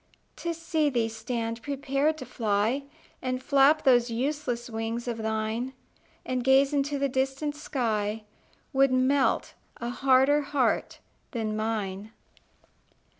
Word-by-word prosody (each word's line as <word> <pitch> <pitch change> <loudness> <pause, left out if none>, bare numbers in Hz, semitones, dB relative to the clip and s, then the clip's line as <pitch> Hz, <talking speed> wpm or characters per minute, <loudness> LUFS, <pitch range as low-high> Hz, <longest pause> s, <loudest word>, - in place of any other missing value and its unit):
To 340 - -2
see 320 -2 0
thee 235 -4 0
stand 230 0 -4
prepared 280 +2 0
to 255 - -7
fly, 225 +3 0 0.4
And 255 0 -2
flap 280 +3 +4
those 245 -3 +4
useless 250 0 -2
wings 225 +1 -4
of 235 -2 -3
thine, 220 +3 -2 0.5
And 255 -1 -1
gaze 270 +2 +4
into 285 0 0
the 280 0 +1
distant 270 +3 -1
sky, 220 -7 -2 0.5
Would 270 0 +4
melt 260 +2 +2 0.2
a 235 - -4
harder 270 +3 +4
heart 275 -4 0 0.4
than 220 -3 -2
mine. 215 -2 -3
255 Hz, 125 wpm, -27 LUFS, 225-275 Hz, 0.5 s, flap